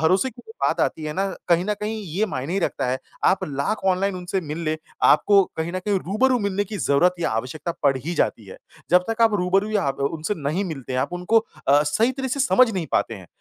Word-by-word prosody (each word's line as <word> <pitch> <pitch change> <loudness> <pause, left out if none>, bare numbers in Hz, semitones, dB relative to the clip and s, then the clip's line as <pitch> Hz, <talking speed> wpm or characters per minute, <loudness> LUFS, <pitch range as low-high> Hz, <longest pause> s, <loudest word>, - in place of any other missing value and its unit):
भरोसे 185 +11 +2
की 245 +1 -15 0.2
बात - - +1
आती 155 - -1
है 150 - -3
ना, 195 +4 0 0.2
कहीं 170 0 +3
न 210 +1 0
कहीं 215 +1 -3
ये 190 +5 -1
मायने 155 +2 -3
रखता 175 - -1
है, 130 +1 -1 0.3
आप 190 - +3
लाख 145 +9 -2
ऑनलाइन 190 +1 +1
उनसे 180 +1 -2
मिल 150 -1 -6
ले, 155 0 0 0.3
आपको 200 -1 +5
कहीं 160 +2 -3
न 185 - -2
कहीं 200 +1 0
रूबरू 245 +8 +2
मिलने 200 -1 -1
की 205 +1 -6
ज़रूरत 170 +5 +3
या 145 - 0
आवश्यकता 130 +9 -3
पड़ 140 -2 +3
ही 160 +7 -4
जाती - - 0
है। - - -10 0.3
जब 180 0 +5
तक 225 +1 0
आप 225 -2 +4
रूबरू 195 +2 +1
या 210 -2 +1
आप 135 -3 -2
उनसे 160 +7 -1
नहीं 155 +5 -2
मिलते 135 -8 -6
हैं, 130 - +1
आप - - -2
उनको 180 +6 +2 0.3
अ, 145 +1 +6
सही 220 - +1
तरह 265 0 -4
से 275 +2 -2
समझ 255 -3 +4
नहीं 180 -5 -2
पाते 115 - +1
हैं। 95 -4 -11
180 Hz, 235 wpm, -23 LUFS, 150-210 Hz, 0.3 s, अ